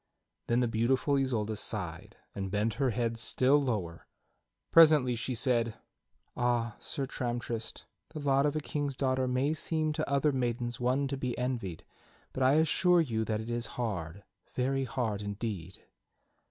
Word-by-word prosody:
Then 120 Hz, +1 st, +2 dB
the 120 Hz, -, +2 dB
beautiful 120 Hz, +5 st, +1 dB
Isolda 115 Hz, -6 st, 0 dB
sighed 95 Hz, -6 st, -4 dB, 0.2 s
and 95 Hz, -1 st, -4 dB
bent 105 Hz, +3 st, 0 dB
her 135 Hz, -, +3 dB
head 115 Hz, 0 st, -1 dB
still 130 Hz, +4 st, +3 dB
lower. 100 Hz, -11 st, -3 dB, 0.6 s
Presently 155 Hz, -6 st, +7 dB
she 120 Hz, +2 st, -2 dB
said: 115 Hz, -2 st, +1 dB, 0.6 s
"Ah! 120 Hz, -2 st, 0 dB
Sir 140 Hz, -, -3 dB
Tramtrist, 120 Hz, -3 st, -4 dB, 0.2 s
the 155 Hz, -, -7 dB
lot 140 Hz, 0 st, +3 dB
of 145 Hz, -, -1 dB
a -, -, +1 dB
king's 145 Hz, -2 st, -3 dB
daughter 130 Hz, -1 st, +1 dB
may 130 Hz, +4 st, +1 dB
seem 155 Hz, -1 st, -1 dB
to 155 Hz, -1 st, -2 dB
other 140 Hz, +2 st, +3 dB
maidens 120 Hz, -2 st, -2 dB
one 130 Hz, +3 st, +1 dB
to 135 Hz, 0 st, -3 dB
be 125 Hz, -2 st, -3 dB
envied, 120 Hz, -10 st, -3 dB, 0.5 s
but 130 Hz, -, -4 dB
I 130 Hz, +1 st, +5 dB
assure 165 Hz, +3 st, +4 dB
you 115 Hz, -8 st, -1 dB
that 110 Hz, -1 st, -1 dB
it 115 Hz, +2 st, -6 dB
is 120 Hz, 0 st, -2 dB
hard, 100 Hz, -6 st, -3 dB, 0.3 s
very 135 Hz, +1 st, 0 dB
hard 115 Hz, -6 st, -2 dB
indeed." 100 Hz, -4 st, -5 dB
125 Hz, 155 wpm, -31 LUFS, 110-135 Hz, 0.6 s, Presently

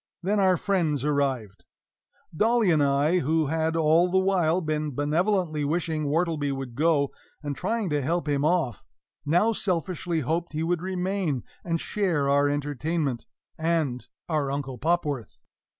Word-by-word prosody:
Then 205 Hz, +3 st, +1 dB
our 185 Hz, -2 st, +4 dB
friends 160 Hz, -9 st, 0 dB
arrived. 130 Hz, -10 st, -1 dB, 0.7 s
Dolly 225 Hz, +1 st, +3 dB
and 155 Hz, -2 st, +3 dB
I, 145 Hz, +5 st, +3 dB
who 160 Hz, +1 st, +1 dB
had 160 Hz, +2 st, 0 dB
all 165 Hz, +2 st, +4 dB
the 190 Hz, -, +2 dB
while 185 Hz, -3 st, +2 dB
been 155 Hz, -4 st, -2 dB
benevolently 155 Hz, +2 st, +1 dB
wishing 155 Hz, 0 st, -1 dB
Wortleby 155 Hz, -2 st, 0 dB
would 135 Hz, -3 st, -5 dB
go, 145 Hz, 0 st, +2 dB, 0.3 s
and 145 Hz, -1 st, -3 dB
trying 220 Hz, +5 st, -1 dB
to 145 Hz, -1 st, +1 dB
help 160 Hz, +3 st, -1 dB
him 145 Hz, -1 st, +1 dB
off, 155 Hz, -, +1 dB, 0.4 s
now 180 Hz, +9 st, +3 dB
selfishly 175 Hz, -3 st, -1 dB
hoped 165 Hz, +5 st, -2 dB
he 155 Hz, +1 st, -1 dB
would 170 Hz, 0 st, 0 dB
remain 185 Hz, -, -2 dB, 0.2 s
and 165 Hz, -1 st, -1 dB
share 175 Hz, -10 st, 0 dB
our 145 Hz, +1 st, +3 dB
entertainment 145 Hz, -1 st, -2 dB, 0.3 s
and 160 Hz, -6 st, 0 dB, 0.2 s
our 150 Hz, -4 st, 0 dB
Uncle 135 Hz, -3 st, -4 dB
Popworth. 150 Hz, -, -1 dB
160 Hz, 145 wpm, -26 LUFS, 145-175 Hz, 0.7 s, our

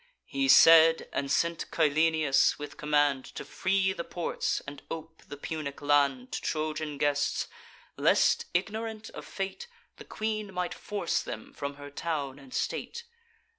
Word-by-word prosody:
He 275 Hz, 0 st, -1 dB
said, 165 Hz, -7 st, +7 dB
and 140 Hz, -1 st, -2 dB
sent 170 Hz, +3 st, 0 dB
Cyllenius 155 Hz, -2 st, +3 dB
with 145 Hz, 0 st, -8 dB
command 145 Hz, -3 st, +2 dB
To -, -, -6 dB
free 190 Hz, 0 st, +1 dB
the 170 Hz, -, -5 dB
ports, 175 Hz, 0 st, -2 dB
and 140 Hz, 0 st, -8 dB
ope 160 Hz, 0 st, -7 dB
the 145 Hz, -, -8 dB
Punic 145 Hz, -1 st, -5 dB
land 140 Hz, -3 st, +2 dB
To -, -, -3 dB
Trojan 155 Hz, -1 st, -2 dB
guests; 145 Hz, 0 st, 0 dB, 0.5 s
lest, -, -, +3 dB
ignorant 220 Hz, +4 st, -3 dB
of -, -, -9 dB
fate, 195 Hz, -, -5 dB, 0.3 s
The -, -, -11 dB
queen 215 Hz, -2 st, -3 dB
might 180 Hz, -1 st, -2 dB
force 205 Hz, -5 st, -2 dB
them 110 Hz, -, -8 dB
from 140 Hz, 0 st, -5 dB
her 145 Hz, 0 st, -10 dB
town 145 Hz, -3 st, -3 dB
and 135 Hz, -2 st, -15 dB
state. 470 Hz, -, -3 dB
155 Hz, 145 wpm, -29 LUFS, 145-180 Hz, 0.5 s, said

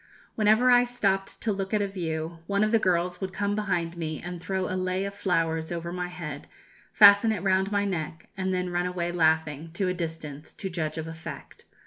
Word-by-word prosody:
Whenever 220 Hz, +4 st, +4 dB
I 245 Hz, 0 st, +7 dB
stopped 200 Hz, -6 st, -1 dB
to 225 Hz, -, 0 dB
look 195 Hz, +1 st, -2 dB
at 210 Hz, -, +2 dB
a -, -, 0 dB
view, 165 Hz, -3 st, -4 dB
one 200 Hz, +1 st, +2 dB
of 215 Hz, -, +1 dB
the 225 Hz, -, +4 dB
girls 180 Hz, -1 st, 0 dB
would 190 Hz, -1 st, -3 dB
come 205 Hz, +1 st, -1 dB
behind 180 Hz, -5 st, -1 dB
me 160 Hz, -2 st, -4 dB
and 175 Hz, -1 st, -7 dB
throw 190 Hz, +1 st, -2 dB
a -, -, -3 dB
lei 185 Hz, +1 st, -1 dB
of 200 Hz, -, -4 dB
flowers 165 Hz, -5 st, 0 dB
over 170 Hz, 0 st, -4 dB
my 180 Hz, 0 st, -2 dB
head, 155 Hz, -5 st, -7 dB, 0.4 s
fasten 205 Hz, +1 st, +7 dB
it 200 Hz, -4 st, -2 dB
round 190 Hz, +1 st, +2 dB
my 205 Hz, 0 st, +1 dB
neck, 160 Hz, -4 st, -4 dB
and 190 Hz, 0 st, -1 dB
then 180 Hz, -1 st, -1 dB
run 175 Hz, +1 st, 0 dB
away 175 Hz, -1 st, -2 dB
laughing, 160 Hz, -2 st, +1 dB
to 185 Hz, +1 st, 0 dB
a -, -, 0 dB
distance, 160 Hz, -4 st, -6 dB
to 190 Hz, -2 st, -5 dB
judge 155 Hz, -2 st, -3 dB
of 160 Hz, 0 st, -4 dB
effect. 160 Hz, 0 st, -9 dB
180 Hz, 210 wpm, -27 LUFS, 165-200 Hz, 0.4 s, I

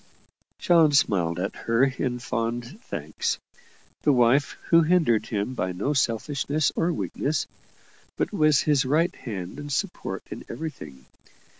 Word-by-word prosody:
John 165 Hz, -4 st, +4 dB
smiled 90 Hz, -, +2 dB
at 95 Hz, -, -3 dB
her 115 Hz, +2 st, +1 dB
in 130 Hz, -2 st, 0 dB
fond 120 Hz, -, -3 dB
thanks 470 Hz, -1 st, -3 dB, 0.6 s
the 150 Hz, -, +3 dB
wife 130 Hz, +2 st, +3 dB
who 165 Hz, 0 st, +7 dB
hindered 155 Hz, -9 st, +2 dB
him 105 Hz, +3 st, -2 dB
by 90 Hz, -7 st, -2 dB
no 105 Hz, +12 st, -1 dB
selfishness 140 Hz, +4 st, 0 dB
or 170 Hz, +2 st, +1 dB
weakness, 155 Hz, -2 st, -2 dB, 0.7 s
but -, -, -1 dB
was 155 Hz, -2 st, +4 dB
his 145 Hz, -3 st, +2 dB
right 155 Hz, +6 st, +1 dB
hand 95 Hz, 0 st, -6 dB
and 145 Hz, 0 st, -7 dB
support 130 Hz, -, -3 dB
in -, -, -6 dB
everything. 75 Hz, -, -7 dB
135 Hz, 135 wpm, -25 LUFS, 115-155 Hz, 0.7 s, who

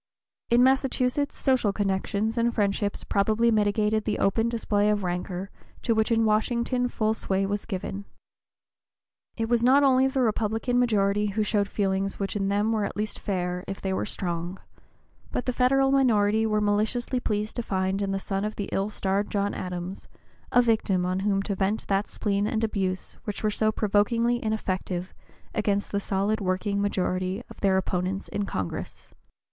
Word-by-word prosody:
In 240 Hz, +1 st, +5 dB
Massachusetts 265 Hz, +1 st, +1 dB
social 255 Hz, -6 st, +2 dB
connections 200 Hz, +2 st, -1 dB
and 235 Hz, 0 st, +2 dB
friendships 205 Hz, -1 st, 0 dB
probably 220 Hz, +4 st, +2 dB
mitigated 215 Hz, 0 st, +2 dB
the 215 Hz, -, 0 dB
open 225 Hz, +4 st, +2 dB
display 210 Hz, -3 st, +1 dB
of 210 Hz, -1 st, +1 dB
rancor 180 Hz, +2 st, -3 dB, 0.3 s
to 230 Hz, -, +2 dB
which 220 Hz, +1 st, +1 dB
in 225 Hz, -1 st, +3 dB
Washington 235 Hz, +3 st, +1 dB
full 220 Hz, -2 st, 0 dB
sway 195 Hz, -3 st, -1 dB
was 200 Hz, +1 st, -3 dB
given. 195 Hz, -1 st, -4 dB, 1.3 s
It 225 Hz, -1 st, -1 dB
was 235 Hz, 0 st, +2 dB
not 265 Hz, +4 st, +5 dB
only 265 Hz, -1 st, +5 dB
the 265 Hz, 0 st, 0 dB
Republican 225 Hz, +2 st, +1 dB
majority 210 Hz, -3 st, +2 dB
who 210 Hz, +2 st, 0 dB
showed 205 Hz, -1 st, +1 dB
feelings 195 Hz, -1 st, -1 dB
which 195 Hz, +1 st, -3 dB
in 195 Hz, -1 st, 0 dB
them 205 Hz, +2 st, +1 dB
were 220 Hz, -2 st, +1 dB
at 200 Hz, -, -4 dB
least 215 Hz, 0 st, -3 dB
fair 180 Hz, -2 st, -2 dB
if 195 Hz, -, -5 dB
they 190 Hz, -1 st, -2 dB
were 190 Hz, -, -1 dB
strong, 175 Hz, -1 st, -3 dB, 0.7 s
but -, -, -2 dB
the 255 Hz, -, 0 dB
Federal 270 Hz, +2 st, +3 dB
minority 220 Hz, -5 st, +3 dB
were 215 Hz, -1 st, +1 dB
maliciously 215 Hz, +5 st, 0 dB
pleased 210 Hz, -2 st, -2 dB
to -, -, 0 dB
find 190 Hz, -2 st, -1 dB
in 200 Hz, -, -1 dB
the 195 Hz, -, 0 dB
son 195 Hz, 0 st, -3 dB
of 215 Hz, 0 st, -3 dB
the 205 Hz, -, -4 dB
ill 195 Hz, +2 st, 0 dB
starred 200 Hz, 0 st, -1 dB
John 200 Hz, 0 st, 0 dB
Adams 180 Hz, +1 st, -5 dB, 0.4 s
a 245 Hz, -, +5 dB
victim 210 Hz, -6 st, +1 dB
on 185 Hz, +1 st, 0 dB
whom 195 Hz, 0 st, +1 dB
to 200 Hz, -, -2 dB
vent 195 Hz, +3 st, -1 dB
that 195 Hz, +1 st, +1 dB
spleen 205 Hz, -1 st, -1 dB
and 220 Hz, 0 st, -1 dB
abuse 190 Hz, -4 st, -2 dB
which 210 Hz, 0 st, -4 dB
were 215 Hz, -, +2 dB
so 215 Hz, +1 st, +1 dB
provokingly 230 Hz, +3 st, +1 dB
ineffective 190 Hz, -4 st, -2 dB, 0.4 s
against 205 Hz, -1 st, 0 dB
the 200 Hz, -, 0 dB
solid 200 Hz, +2 st, 0 dB
working 200 Hz, +2 st, 0 dB
majority 185 Hz, +1 st, -1 dB
of -, -, -13 dB
their 195 Hz, -1 st, +3 dB
opponents 190 Hz, +1 st, -2 dB
in 205 Hz, -1 st, -2 dB
Congress. 95 Hz, -3 st, -5 dB
205 Hz, 175 wpm, -26 LUFS, 195-225 Hz, 1.3 s, In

